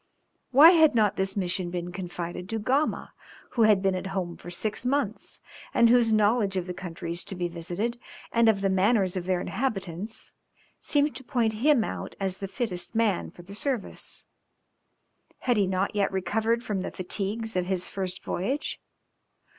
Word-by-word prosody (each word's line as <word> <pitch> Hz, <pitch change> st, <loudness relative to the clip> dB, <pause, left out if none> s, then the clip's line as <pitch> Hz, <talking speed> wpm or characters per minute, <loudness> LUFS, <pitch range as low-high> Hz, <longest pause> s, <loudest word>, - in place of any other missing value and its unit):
Why 295 Hz, +6 st, +9 dB
had 320 Hz, -6 st, +5 dB
not 210 Hz, -2 st, +3 dB
this 190 Hz, +1 st, -1 dB
mission 180 Hz, -1 st, -1 dB
been 175 Hz, 0 st, -4 dB
confided 180 Hz, 0 st, -5 dB
to 225 Hz, -, -1 dB
Gama, 265 Hz, +8 st, 0 dB, 0.4 s
who 235 Hz, -, 0 dB
had 200 Hz, -2 st, +4 dB
been 195 Hz, -1 st, +3 dB
at 185 Hz, +1 st, -3 dB
home 175 Hz, -2 st, -2 dB
for 175 Hz, -, -10 dB
six 210 Hz, +6 st, -3 dB
months, 250 Hz, -4 st, -2 dB, 0.4 s
and 235 Hz, -1 st, +6 dB
whose 235 Hz, -2 st, +5 dB
knowledge 210 Hz, -2 st, +3 dB
of 180 Hz, -, -1 dB
the 180 Hz, -, -5 dB
countries 170 Hz, -1 st, -5 dB
to 195 Hz, -, -5 dB
be 175 Hz, -1 st, -1 dB
visited 175 Hz, +8 st, -3 dB, 0.3 s
and 230 Hz, -1 st, +4 dB
of 200 Hz, -3 st, +2 dB
the 195 Hz, -, +2 dB
manners 190 Hz, 0 st, +2 dB
of 180 Hz, -2 st, -3 dB
their 185 Hz, -1 st, +1 dB
inhabitants, 195 Hz, -3 st, -3 dB, 0.5 s
seemed 290 Hz, 0 st, +1 dB
to 265 Hz, -, -10 dB
point 240 Hz, -4 st, +1 dB
him 285 Hz, -4 st, +5 dB
out -, -, -5 dB
as 190 Hz, -1 st, -2 dB
the 195 Hz, -, -5 dB
fittest 200 Hz, -2 st, -3 dB
man 220 Hz, -5 st, +1 dB
for 175 Hz, -, -14 dB
the 190 Hz, +3 st, -11 dB
service? 245 Hz, 0 st, -3 dB, 1.2 s
Had 245 Hz, -3 st, +2 dB
he 200 Hz, -2 st, +3 dB
not 190 Hz, +1 st, 0 dB
yet 200 Hz, -1 st, +1 dB
recovered 225 Hz, +5 st, 0 dB
from 205 Hz, -5 st, -2 dB
the -, -, -3 dB
fatigues 205 Hz, +4 st, -3 dB
of 180 Hz, -1 st, 0 dB
his 185 Hz, -2 st, -1 dB
first 185 Hz, -1 st, -4 dB
voyage? 260 Hz, +12 st, -2 dB
195 Hz, 175 wpm, -27 LUFS, 185-230 Hz, 1.2 s, Why